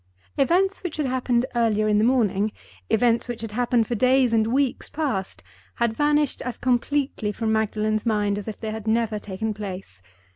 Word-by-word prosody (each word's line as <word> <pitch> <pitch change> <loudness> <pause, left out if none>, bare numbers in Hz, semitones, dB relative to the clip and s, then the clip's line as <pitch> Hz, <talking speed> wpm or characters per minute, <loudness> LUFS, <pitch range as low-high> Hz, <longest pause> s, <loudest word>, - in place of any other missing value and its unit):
Events 380 +7 +2
which 360 -4 -5
had 300 - 0
happened 250 -1 +1
earlier 220 -3 +2
in 210 -1 +3
the - - +3
morning, 220 -4 +2 0.4
events 230 +2 +2
which 240 -2 -5
had 225 - -5
happened 240 0 +1
for 240 - -3
days 255 +1 +3
and 220 -1 +3
weeks 265 +2 0
past, 260 -12 -3 0.3
had 235 -2 +1
vanished 295 +2 +1
as 250 -1 -4
completely 255 -3 0
from 220 +1 -2
Magdalen's 215 0 0
mind 205 -3 0
as 205 - -9
if 215 - -6
they 220 -1 -4
had 220 0 -6
never 220 -1 +1
taken 210 +2 -4
place. 190 - -7
225 Hz, 180 wpm, -24 LUFS, 215-255 Hz, 0.4 s, in